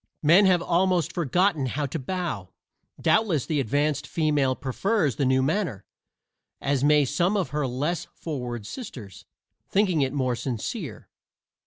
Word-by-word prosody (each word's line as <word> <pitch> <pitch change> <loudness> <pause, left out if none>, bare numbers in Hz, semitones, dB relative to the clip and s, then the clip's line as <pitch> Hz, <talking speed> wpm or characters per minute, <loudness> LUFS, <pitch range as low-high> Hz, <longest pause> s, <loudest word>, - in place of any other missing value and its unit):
Men 175 +7 +6
have 180 -2 +3
almost 180 -2 +1
forgotten 170 -2 +1
how 145 +4 -2
to 140 +4 -4
bow. 165 - -4 0.5
Doubtless 190 - +2
the 155 -3 0
advanced 145 +4 0
female 150 -5 +1
prefers 150 - 0
the 140 - +1
new 130 0 +3
manner, 150 - -1 0.7
as 140 -1 0
may 150 0 +5
some 175 +9 +1
of 185 -8 -1
her 150 0 -1
less 145 +8 -2
forward 125 -8 -5
sisters, 120 - -9 0.4
thinking 190 -6 +2
it 135 -1 +1
more 130 -3 0
sincere. 120 -2 -5
150 Hz, 140 wpm, -25 LUFS, 130-175 Hz, 0.7 s, Men